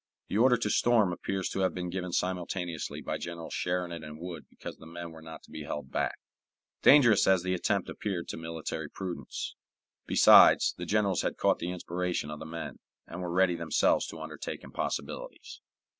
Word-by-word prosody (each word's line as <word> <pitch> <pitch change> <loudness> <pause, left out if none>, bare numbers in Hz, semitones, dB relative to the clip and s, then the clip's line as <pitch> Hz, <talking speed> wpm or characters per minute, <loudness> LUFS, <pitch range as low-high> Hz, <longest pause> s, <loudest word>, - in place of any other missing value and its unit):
The 100 - -1
order 125 +1 +5
to 110 -2 -1
storm 110 -6 +3
appears 95 +1 -2
to - - -3
have 95 -1 +1
been 90 -1 -3
given 90 -1 -3
simultaneously 90 -2 -2
by - - -3
Generals 85 -1 -6
Sheridan 90 -2 -2
and 75 0 -9
Wood 85 -3 -7
because - - -9
the 80 - -13
men 85 0 -7
were 80 0 -12
not 80 0 -10
to - - -18
be 80 - -7
held 75 -2 -5
back, - - -1 0.6
dangerous 120 -8 +7
as 95 -2 +4
the 90 0 0
attempt 100 +1 0
appeared 95 -5 -4
to - - -4
military 80 -1 -5
prudence. 90 0 -5 0.5
Besides, - - +7
the 90 - -6
generals 100 -3 +2
had - - -2
caught - - +2
the 85 - -3
inspiration 90 -3 -3
of 75 - -6
the 80 - -7
men, 85 +1 -6 0.3
and 85 +2 -7
were 90 - -3
ready 90 +1 +3
themselves 85 -2 +2
to 80 - -8
undertake 75 -1 -6
impossibilities. - - -5
90 Hz, 185 wpm, -30 LUFS, 80-95 Hz, 0.6 s, dangerous